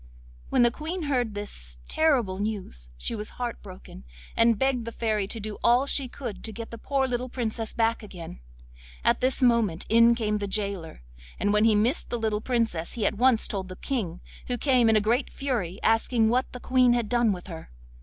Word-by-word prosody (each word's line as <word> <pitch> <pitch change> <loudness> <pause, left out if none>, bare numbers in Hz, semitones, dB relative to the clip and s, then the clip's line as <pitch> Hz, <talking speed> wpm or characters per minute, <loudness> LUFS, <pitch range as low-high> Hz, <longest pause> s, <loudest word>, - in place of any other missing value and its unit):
When 245 - +4
the 240 - +5
Queen 320 +7 -4
heard 250 -7 0
this 65 - -4
terrible 250 -12 +1
news 195 - -4
she - - -3
was 210 -1 -5
heart 245 -1 -4
broken, 185 - -12 0.3
and 230 -1 +4
begged 265 -2 0
the 230 - -5
Fairy 215 -3 -1
to 225 - -3
do 215 0 -6
all 245 +3 +4
she 280 -1 0
could 240 -4 -7
to 220 - -3
get 225 +2 -8
the 230 - -8
poor 270 +1 0
little 250 0 -2
Princess 225 -2 -2
back 230 0 +1
again. 175 - -9 0.6
At - - +2
this 260 +1 +1
moment 230 -9 +2
in 230 +1 +6
came 210 -2 -1
the 200 - -3
gaoler, 195 - -2 0.4
and 205 - +1
when 210 +1 +4
he 220 -2 +5
missed 230 +9 +1
the 240 - -1
little 215 -2 -1
Princess 225 -9 -1
he 220 -4 -2
at - - +2
once 250 -3 +4
told 190 -2 -4
the 185 - -8
King, 185 -9 -3 0.3
who 245 - -1
came 250 -2 +3
in 220 - +4
a 215 - +4
great 235 +6 0
fury 220 -9 -3
asking 225 0 +3
what 250 +3 +1
the 250 - -8
Queen 255 -1 +3
had 240 -2 0
done 240 -1 +2
with 180 -2 -5
her. 165 -4 -9
225 Hz, 205 wpm, -26 LUFS, 205-245 Hz, 0.6 s, in